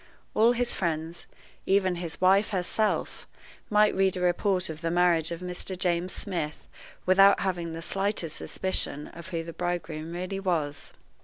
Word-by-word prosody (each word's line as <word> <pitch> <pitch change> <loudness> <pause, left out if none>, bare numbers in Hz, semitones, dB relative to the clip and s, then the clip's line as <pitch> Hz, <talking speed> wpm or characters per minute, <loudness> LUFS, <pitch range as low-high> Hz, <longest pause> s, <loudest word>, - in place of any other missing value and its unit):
All 230 +3 +5
his 245 0 0
friends, 165 -1 -3 0.4
even 190 -2 +2
his 170 -2 -5
wife 195 +3 +4
herself, 205 +2 -1 0.4
might 210 0 +4
read 190 -1 +2
a - - -3
report 180 +1 +1
of 160 0 -7
the 165 - -1
marriage 175 -2 +3
of 170 0 -5
Mr. 180 +1 -5
James 180 0 0
Smith 170 -7 -4 0.4
without 195 +2 +6
having 175 -3 -2
the 165 0 -6
slightest 195 -4 -1
suspicion 170 -5 -1
of 170 0 -11
who 165 -3 -3
the 165 0 -8
bridegroom 170 -3 -3
really 185 +2 -4
was. 160 -7 -2
180 Hz, 155 wpm, -27 LUFS, 165-195 Hz, 0.4 s, without